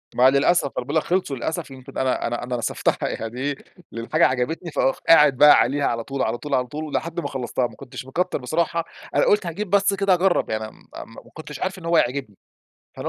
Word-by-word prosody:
ما 125 +2 +6
للأسف، 140 +6 +3
ما 140 - -4
أنا 125 - -2
باقول 145 - -4
لك 160 - +3
خلصوا 180 -6 -1
للأسف. 160 +4 -4
يمكن 135 +1 -11
أنا 130 -2 0
أنا 120 +1 -3
أنا 125 0 -3
نسفتها 115 - -1
يعني 115 +2 -5
إيه، 145 +1 -1 0.4
الحاجة 120 +8 +2
عجبتني 145 +7 -2
فأخ 135 - 0
قاعد 150 -5 +6
بقى 150 +1 +8
عليها 140 +1 +2
على 115 -1 -1
طول، 135 +2 -4
على 115 +2 0
طول، 150 - -6
على 125 -1 0
طول 150 +5 -6
ولحد 165 +2 -3
ما - - -3
خلصتها 125 -1 -2
ما - - -16
كنتش 130 -1 -9
مكتّر 180 +7 -1
بصراحة. 165 +5 -1 0.3
أنا - - +4
قُلت 205 -2 +3
هاجيب 180 +4 -4
بس 200 +1 +3
كده 195 -1 +2
أجرب 180 0 +2
يعني 110 0 -3
م - - -21 0.2
م 115 - -9
ما - - -19
كنتش 150 -3 -9
عارف 190 0 -3
إن 170 - -11
هو 170 - +1
هيعجبني، 125 -7 -1 0.6
فأنا - - -4
140 Hz, 230 wpm, -23 LUFS, 125-170 Hz, 0.6 s, بقى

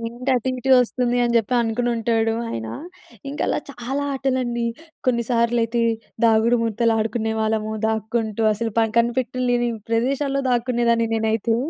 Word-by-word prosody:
"ఏంటది 245 +2 -1
ఇటే 265 +2 -2
వస్తుంది" 245 0 0
అని 235 - 0
చెప్పి 230 +2 +1
అనుకునుంటాడు 225 -1 0 0.2
ఆయన. 110 -1 -4 0.6
ఇంక 285 - -6
అలా - - +1
చాలా 270 +2 -4
ఆటలండి 255 -3 -1 0.4
కొన్నిసార్లయితే 235 -1 +1 0.4
దాగుడు 225 +2 +3
మూతలు 230 0 +1
ఆడుకునేవాళ్ళము 220 -1 -1
దాక్కుంటూ 220 0 -1
అసలు 225 +1 -3
పన్ 225 -1 +1
కనిపెట్టలేని 245 0 +1 0.2
ప్రదేశాల్లో 275 +4 0
దాక్కునేదాన్ని 235 -1 +1
నేనైతే. 225 +1 +1
235 Hz, 115 wpm, -22 LUFS, 225-245 Hz, 0.6 s, దాగుడు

